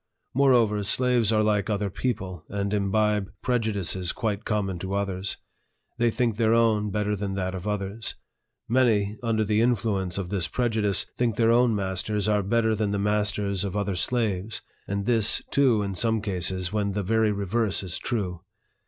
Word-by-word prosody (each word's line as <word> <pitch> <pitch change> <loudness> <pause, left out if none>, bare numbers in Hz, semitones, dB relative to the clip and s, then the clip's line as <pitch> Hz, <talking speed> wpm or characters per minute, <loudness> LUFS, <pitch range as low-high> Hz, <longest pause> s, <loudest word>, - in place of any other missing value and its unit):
Moreover, 120 -6 +4
slaves 120 +1 +2
are 110 -1 +3
like 105 -1 +1
other 105 -2 -1
people, 95 -8 -3
and 100 0 -2
imbibe 105 0 +1
prejudices 100 -7 0
quite 110 -3 -2
common 100 -4 -1
to 95 +2 -3
others. 100 -1 -2 0.6
They 120 0 +4
think 115 -2 0
their 115 0 +3
own 110 -2 +3
better 105 +1 0
than 100 -1 -3
that 95 -1 -2
of 95 +2 -5
others. 105 +1 -3 0.5
Many, 110 -4 +2
under 115 -2 +1
the 105 0 +1
influ 115 -4 +1
ence 90 -1 -4
of 95 -3 -3
this 95 -4 -1
prejudice, 110 -5 0
think 120 -3 0
their 115 +1 +3
own 120 -1 +4
masters 100 +2 -1
are 105 -1 +3
better 110 +3 +1
than 105 -1 0
the 100 - -1
masters 105 -1 0
of 100 0 -3
other 100 -2 -1
slaves; 110 -1 -1 0.2
and 100 0 -2
this, 115 -3 +2
too, 125 -6 +3
in 100 -1 -3
some 110 +4 +1
cases, 95 -2 -2
when 100 -2 0
the 100 0 -1
very 110 +2 +2
reverse 100 +1 -1
is 90 -2 -4
true. 95 -8 -3
105 Hz, 170 wpm, -26 LUFS, 100-115 Hz, 0.6 s, Moreover